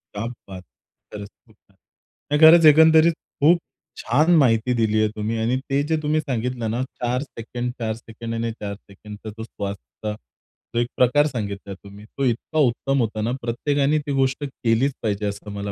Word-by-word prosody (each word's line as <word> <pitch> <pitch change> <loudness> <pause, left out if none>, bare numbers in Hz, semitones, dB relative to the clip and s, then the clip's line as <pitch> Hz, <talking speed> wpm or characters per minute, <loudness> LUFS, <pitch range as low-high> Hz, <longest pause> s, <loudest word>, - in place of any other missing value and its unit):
क्या 105 - -3 0.2
बात! 95 -2 -9 0.5
खरंच 100 -1 -7 0.2
खूप - - -24
छान. - - -29 0.6
नाही 150 - +2
खरंच 160 +1 +8
एकंदरीत 160 +2 +7 0.3
खूप 170 +3 +6 0.4
छान 150 +9 +2
माहिती 125 -3 +3
दिली 110 -2 +1
आहे 110 - +3
तुम्ही 110 +2 -2
आणि 120 +3 +1
ते 140 +1 +2
जे 160 - +1
तुम्ही 155 +1 +1
सांगितलं 125 -4 -3
ना 120 +2 -1
4 125 0 -3
सेकंद, 120 -2 -5
4 110 -1 -1
सेकंद, 115 0 -8
आणि 115 0 -2
4 105 -2 -6
सेकंदचा 105 +2 -12
तो 110 - -6
श्वास 100 -3 -5
होता 105 +1 -7 0.6
जो 120 - +2
एक 120 - +1
प्रकार 135 +4 +4
सांगितला 100 -6 -5
तुम्ही 100 +2 -13
तो 135 +4 -4
इतका 130 +6 -1
उत्तम 135 +3 -1
होता 110 -2 -1
ना, 115 +3 -1
प्रत्येकाने 140 +5 0
ती 145 -1 -5
गोष्ट 135 +2 0
केलीच 130 +1 0
पाहिजे 105 -1 -1
असं 100 0 -5
मला 100 0 -4
115 Hz, 180 wpm, -22 LUFS, 110-140 Hz, 0.6 s, खरंच